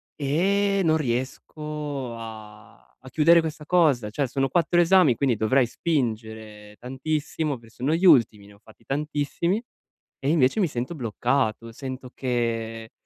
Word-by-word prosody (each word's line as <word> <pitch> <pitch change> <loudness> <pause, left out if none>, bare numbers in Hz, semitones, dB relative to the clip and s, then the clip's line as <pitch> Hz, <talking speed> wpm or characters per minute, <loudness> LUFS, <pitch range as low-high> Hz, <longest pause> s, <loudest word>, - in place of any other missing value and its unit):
e 195 +7 +1
non 160 -2 +3
riesco 140 0 -4
a 110 - -11 0.2
a - - -9
chiudere 165 +4 +5
questa 160 -1 -6
cosa. 150 -11 +2
Cioè 135 +6 -1
sono 135 +2 0
4 175 +5 +1
esami, 175 -6 +5
quindi 130 -2 +1
dovrei 120 +5 +2
spingere 110 -7 -4
tantissimo 145 +3 -3
pe 115 -1 -18
sono 130 +6 -2
gli 170 +4 +1
ultimi, 115 - +5
ne 100 - -16
ho 100 - -21
fatti 110 +1 -20
tantissimi, 150 +7 -1 0.6
e 135 - -1
invece 155 +4 +3
mi 185 - +3
sento 125 +3 -4
bloccato, 115 -2 -1
sento 130 0 -7
che 115 -3 -3
135 Hz, 140 wpm, -24 LUFS, 115-155 Hz, 0.6 s, chiudere